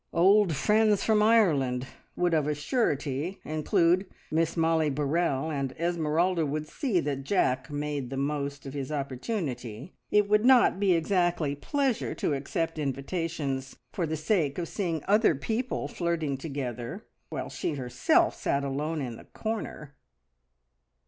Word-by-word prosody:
"Old 190 Hz, 0 st, +5 dB
friends 210 Hz, +4 st, +3 dB
from 215 Hz, -1 st, +3 dB
Ireland" 150 Hz, -, +3 dB, 0.3 s
would 175 Hz, -1 st, +1 dB
of 155 Hz, -2 st, +2 dB
a 150 Hz, -, 0 dB
surety 150 Hz, -, -1 dB
include 165 Hz, +4 st, +2 dB, 0.2 s
Miss 165 Hz, +2 st, +1 dB
Mollie 160 Hz, -1 st, +2 dB
Burrell, 145 Hz, +1 st, 0 dB
and 135 Hz, -3 st, -2 dB
Esmeralda 170 Hz, +1 st, +1 dB
would 150 Hz, +1 st, -2 dB
see 235 Hz, -, 0 dB
that 140 Hz, -2 st, -3 dB
Jack 130 Hz, -6 st, +1 dB
made 145 Hz, -3 st, -3 dB
the 135 Hz, -, -4 dB
most 140 Hz, 0 st, -2 dB
of 135 Hz, -, -6 dB
his 140 Hz, -1 st, -4 dB
opportunity. 135 Hz, -, -4 dB, 0.2 s
It 210 Hz, -1 st, +3 dB
would 210 Hz, +1 st, +3 dB
not 250 Hz, -6 st, +5 dB
be 200 Hz, -2 st, +4 dB
exactly 170 Hz, -3 st, +1 dB
pleasure 265 Hz, -, -1 dB
to -, -, 0 dB
accept 155 Hz, +4 st, -2 dB
invitations 140 Hz, -1 st, -3 dB, 0.2 s
for 170 Hz, -4 st, -1 dB
the 160 Hz, +1 st, -2 dB
sake 155 Hz, -3 st, 0 dB
of 175 Hz, -2 st, -2 dB
seeing 170 Hz, -6 st, -2 dB
other 210 Hz, -4 st, +4 dB
people 225 Hz, -, -2 dB
flirting 165 Hz, -5 st, -1 dB
together, 130 Hz, -5 st, -5 dB, 0.2 s
while -, -, -5 dB
she 150 Hz, -, -2 dB
herself 125 Hz, -3 st, +2 dB
sat 140 Hz, 0 st, -1 dB
alone 150 Hz, +3 st, -2 dB
in 120 Hz, -3 st, -6 dB
a -, -, -14 dB
corner. 215 Hz, -9 st, -5 dB
155 Hz, 140 wpm, -28 LUFS, 140-185 Hz, 0.3 s, Old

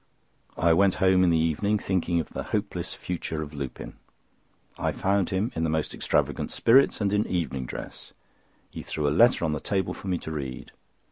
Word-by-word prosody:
I 85 Hz, 0 st, +4 dB
went 95 Hz, +2 st, +4 dB
home 95 Hz, -1 st, +4 dB
in 90 Hz, -, +4 dB
the 85 Hz, -, +3 dB
evening, 80 Hz, +7 st, +1 dB
thinking 90 Hz, -3 st, 0 dB
of 80 Hz, -, -5 dB
the -, -, -4 dB, 0.2 s
hopeless -, -, -4 dB
future 80 Hz, -3 st, -4 dB
of 75 Hz, 0 st, -10 dB
Lupin. 70 Hz, -3 st, -7 dB, 0.8 s
I -, -, -1 dB
found 100 Hz, -1 st, 0 dB
him 100 Hz, +6 st, -1 dB
in 80 Hz, -, -3 dB
most 80 Hz, -1 st, -1 dB
extravagant -, -, 0 dB
spirits 130 Hz, 0 st, +4 dB
and 100 Hz, 0 st, +1 dB
in 105 Hz, +1 st, +1 dB
evening 70 Hz, -8 st, -2 dB
dress. -, -, -8 dB, 0.6 s
He -, -, -7 dB
threw 75 Hz, -2 st, -2 dB
a -, -, +2 dB
letter 115 Hz, 0 st, +4 dB
on 75 Hz, -, 0 dB
the 75 Hz, -, -2 dB
table 95 Hz, -2 st, -1 dB
for -, -, -9 dB
me 90 Hz, -2 st, 0 dB
to 80 Hz, -, -7 dB
read. 70 Hz, -5 st, -6 dB
85 Hz, 190 wpm, -26 LUFS, 80-100 Hz, 0.8 s, I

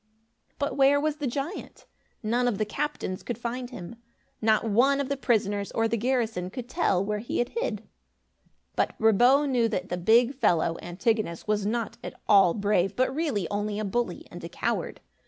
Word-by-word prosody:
But 285 Hz, 0 st, -2 dB
where 275 Hz, +1 st, +5 dB
was 305 Hz, 0 st, -1 dB
the 290 Hz, -3 st, -2 dB
giant? 280 Hz, +9 st, -5 dB, 0.4 s
None 240 Hz, +3 st, +1 dB
of 230 Hz, -5 st, 0 dB
the 215 Hz, -, 0 dB
captains 210 Hz, -5 st, -3 dB
could 240 Hz, -, -4 dB
find 245 Hz, +1 st, -4 dB
him. 230 Hz, -2 st, -9 dB, 0.4 s
Not 220 Hz, 0 st, +2 dB
one 260 Hz, +7 st, +3 dB
of 275 Hz, -1 st, -2 dB
the 280 Hz, -, 0 dB
prisoners 205 Hz, -6 st, 0 dB
or 225 Hz, 0 st, +2 dB
the 230 Hz, -, 0 dB
garrison 225 Hz, -6 st, -1 dB
could 245 Hz, +3 st, -7 dB
tell 220 Hz, -, +1 dB
where 210 Hz, 0 st, -2 dB
he 230 Hz, -, -4 dB
had 240 Hz, -, 0 dB
hid. 475 Hz, +1 st, -3 dB, 0.9 s
But -, -, 0 dB
Brabo 245 Hz, +6 st, +5 dB
knew 245 Hz, -4 st, +2 dB
that 185 Hz, -2 st, -3 dB
the 180 Hz, -, -2 dB
big 230 Hz, +8 st, +4 dB
fellow, 170 Hz, -, +2 dB
Antigonus, 180 Hz, 0 st, -1 dB
was 210 Hz, -1 st, 0 dB
not 230 Hz, 0 st, -2 dB
at -, -, -8 dB
all 195 Hz, -5 st, +6 dB
brave, 200 Hz, -2 st, +1 dB
but 255 Hz, +1 st, +1 dB
really 275 Hz, -, -1 dB
only 205 Hz, 0 st, -2 dB
a 215 Hz, -, -2 dB
bully 240 Hz, +5 st, -2 dB
and -, -, -9 dB
a -, -, -6 dB
coward. -, -, -3 dB
230 Hz, 185 wpm, -27 LUFS, 205-260 Hz, 0.9 s, all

